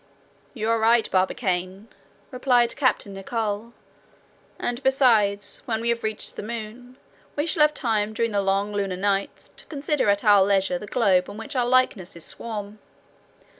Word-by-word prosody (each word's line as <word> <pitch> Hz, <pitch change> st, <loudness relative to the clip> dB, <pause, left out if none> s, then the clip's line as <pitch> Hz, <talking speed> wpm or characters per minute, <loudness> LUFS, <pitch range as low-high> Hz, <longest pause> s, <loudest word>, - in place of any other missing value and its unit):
"You 220 Hz, -2 st, -3 dB
are 230 Hz, -, +2 dB
right, 225 Hz, +1 st, +4 dB
Barbicane," 185 Hz, +1 st, -1 dB, 0.4 s
replied 250 Hz, -2 st, +2 dB
Captain 255 Hz, -7 st, 0 dB
Nicholl; 210 Hz, +2 st, -3 dB, 0.9 s
"and, 240 Hz, +2 st, -3 dB
besides, 230 Hz, -7 st, +2 dB
when 225 Hz, -4 st, -1 dB
we 235 Hz, +1 st, -1 dB
have 235 Hz, 0 st, 0 dB
reached 220 Hz, 0 st, -4 dB
the -, -, -5 dB
moon, 235 Hz, +3 st, -8 dB, 0.4 s
we 290 Hz, -, 0 dB
shall 330 Hz, -1 st, +1 dB
have 300 Hz, 0 st, +4 dB
time 220 Hz, -5 st, 0 dB
during 230 Hz, +1 st, -1 dB
the 200 Hz, -1 st, +1 dB
long 195 Hz, +1 st, 0 dB
lunar 195 Hz, -3 st, -2 dB
nights 200 Hz, +1 st, -2 dB
to -, -, -15 dB
consider 295 Hz, -5 st, -1 dB
at 200 Hz, 0 st, +2 dB
our 205 Hz, -3 st, +6 dB
leisure 190 Hz, -2 st, +1 dB
the 210 Hz, -, -9 dB
globe 195 Hz, -6 st, +2 dB
on 205 Hz, -, -9 dB
which 250 Hz, +6 st, -7 dB
our 245 Hz, -2 st, +1 dB
likenesses 205 Hz, -10 st, 0 dB
swarm." 210 Hz, -2 st, -6 dB
220 Hz, 160 wpm, -24 LUFS, 200-245 Hz, 0.9 s, our